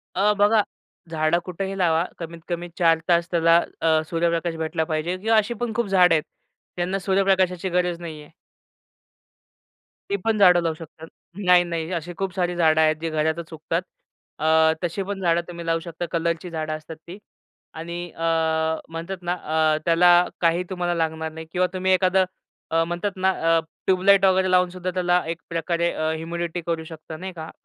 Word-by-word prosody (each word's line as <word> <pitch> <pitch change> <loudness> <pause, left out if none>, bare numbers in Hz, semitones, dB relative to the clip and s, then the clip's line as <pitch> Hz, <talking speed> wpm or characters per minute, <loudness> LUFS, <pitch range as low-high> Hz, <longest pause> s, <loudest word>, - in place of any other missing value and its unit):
अ, 205 +3 +3
बघा, 210 +1 +4 0.5
झाडं 155 +1 +1
कुठेही 190 +2 -4
लावा, 170 -3 +2 0.2
कमीत 165 0 -7
कमी 175 0 -3
4 165 -2 +4
तास 170 -1 +3
त्याला 165 0 +5 0.2
अ, 160 -1 +3
सूर्यप्रकाश 170 0 0
भेटला 160 0 -2
पाहिजे. 160 +3 -2
किंवा 220 +3 +2
अशी 215 +3 +1
पण 235 0 -3
खूप 235 -2 0
झाडं 180 -3 +5
आहेत. 155 - +1 0.5
त्यांना 180 +2 -1
सूर्यप्रकाशाची 190 -1 +1
गरज 180 -1 0
नाही 160 -3 -7
आहे. 150 - -15 1.8
ती 200 - +1
पण 225 -1 +2
झाडं 180 -3 +6
लावू 165 -1 0
शकतात. 160 0 -12 0.4
नाही, 180 -1 +6
नाही 170 0 -4
अशी 170 +1 -4
खूप 195 -2 -3
सारी 175 -1 0
झाडं 160 -2 +3
आहेत 155 0 +3
जी 165 - -2
घरातच 160 +1 -2
उगतात. 165 +2 -2 0.6
अ, 160 +1 +4
तशी 175 +3 -2
पण 200 0 -5
झाडं 170 -1 +2
तुम्ही 170 -1 -8
लावू 165 0 +1
शकता, 170 +1 -6
कलरची 170 +1 -1
झाडं 155 -1 -3
असतात 155 +1 -8
ती. 180 +4 -8 0.6
आणि 170 +2 -6
अ, - - -12 0.7
म्हणतात 165 +4 -5
ना 175 0 -1 0.4
अ, - - -1
त्याला 175 +1 +5 0.3
काही 170 +1 +2
तुम्हाला 175 -2 -1
लागणार 160 -1 -2
नाही 160 0 -9
किंवा 180 +1 +1
तुम्ही 185 0 0
एखादं 185 0 +3 0.5
अ, 165 0 +3
म्हणतात 175 +4 -2
ना 190 0 +1 0.3
अ, - - +3 0.3
ट्यूबलाइट 190 +1 +5
वगैरे 185 0 +3
लावून 180 0 +4
सुद्धा 185 0 -4
त्याला 180 0 +2
एक 165 0 -3
प्रकारे 170 +1 0
अ, 155 0 -1
इम्युनिटी 170 +1 -4
करू 165 -1 -1
शकता, 160 0 -9
नाही 185 +2 -7
का, 160 -1 -8
170 Hz, 175 wpm, -23 LUFS, 165-185 Hz, 1.8 s, झाडं